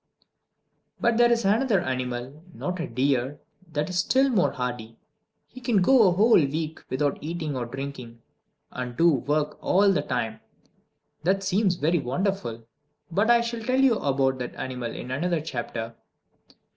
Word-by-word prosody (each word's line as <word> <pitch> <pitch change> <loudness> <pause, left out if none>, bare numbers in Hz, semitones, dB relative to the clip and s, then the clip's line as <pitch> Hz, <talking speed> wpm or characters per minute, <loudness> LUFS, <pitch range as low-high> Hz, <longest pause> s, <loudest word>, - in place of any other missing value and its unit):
But 235 -1 +2
there 240 0 +5
is 235 -2 +1
another 215 +1 +3
animal, 130 0 -4
not 180 0 -4
a 165 - -2
deer, 130 +2 0 0.3
that 150 -1 -1
is 180 0 -1
still 265 +7 +3
more 190 -6 +3
hardy: 120 -3 -5 0.5
he 255 - -13
can 235 -5 +2
go 245 -2 +6
a - - +4
whole 210 +2 +5
week 155 +3 -3
without 140 +2 0
eating 155 -2 -4
or 120 -2 -3
drinking 130 -2 -7 0.5
and 125 -1 -6
do 170 0 +5
work 150 +2 -1
all 200 +2 +4
the 170 - +1
time! 115 -5 -3 0.8
That 190 +4 +1
seems 195 0 +2
very 165 +2 +1
wonderful. 130 - -2 0.5
But 205 +7 +1
I 235 0 +6
shall 235 0 -4
tell 255 +3 0
you 260 -5 +4
about 135 -1 +1
that 125 - -5
animal 125 -3 -4
in 125 - -7
another 170 +5 0
chapter. 120 -6 -5
155 Hz, 160 wpm, -25 LUFS, 130-195 Hz, 0.8 s, go